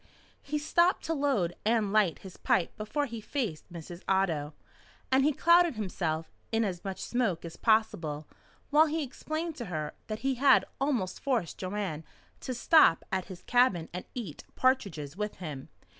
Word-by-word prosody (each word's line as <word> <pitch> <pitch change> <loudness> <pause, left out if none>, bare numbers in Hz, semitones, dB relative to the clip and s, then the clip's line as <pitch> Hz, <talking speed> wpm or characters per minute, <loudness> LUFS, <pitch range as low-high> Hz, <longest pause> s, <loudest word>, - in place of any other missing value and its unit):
He 300 +2 -2
stopped 345 +4 +2
to 325 - -1
load 270 - 0
and 215 -2 +1
light 205 -7 +3
his 190 - -9
pipe 175 - +1
before 285 +8 -2
he 230 -4 -7
faced 210 - -4
Mrs. 170 +1 -8
Otto, 165 -6 +1 0.6
and 265 +1 +5
he 300 - +4
clouded 340 +1 +4
himself 170 -6 -2 0.2
in 225 0 +2
as 180 -2 -4
much 195 -2 -5
smoke 220 -10 -1
as 165 - -7
possible 175 -10 +1 0.4
while 310 +2 +6
he 315 +1 -1
explained 310 +4 -4
to 240 - -5
her 155 -5 -4
that 215 0 -4
he 270 - +3
had 280 - +6
almost 245 -10 -1
forced 240 - -1
Joanne 185 -5 -3 0.4
to 255 - -4
stop 245 - +5
at 190 -1 -1
his 180 -1 -10
cabin 245 -10 +3
and 180 - -5
eat 205 - -6
partridges 190 - 0
with 210 +1 -3
him. 150 -7 -7
210 Hz, 165 wpm, -30 LUFS, 175-270 Hz, 0.6 s, while